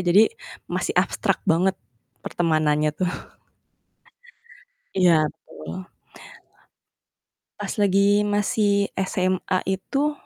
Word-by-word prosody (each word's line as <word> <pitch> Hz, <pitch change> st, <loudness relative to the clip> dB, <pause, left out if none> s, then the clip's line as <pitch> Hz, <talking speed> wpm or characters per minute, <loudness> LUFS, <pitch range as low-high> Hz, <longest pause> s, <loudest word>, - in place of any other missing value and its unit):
jadi 180 Hz, -, +4 dB, 0.3 s
masih -, -, -3 dB
abstrak -, -, +1 dB
banget 180 Hz, +4 st, +2 dB, 0.5 s
pertemanannya 155 Hz, -3 st, +1 dB
tuh. 180 Hz, 0 st, 0 dB, 1.8 s
Iya, 170 Hz, -5 st, +4 dB, 0.2 s
betul. 185 Hz, 0 st, -8 dB, 1.7 s
Pas -, -, -4 dB
lagi 200 Hz, +1 st, +3 dB
masih 205 Hz, 0 st, +1 dB
SMA 185 Hz, 0 st, 0 dB
itu, 275 Hz, +10 st, -1 dB
185 Hz, 75 wpm, -23 LUFS, 175-200 Hz, 1.8 s, jadi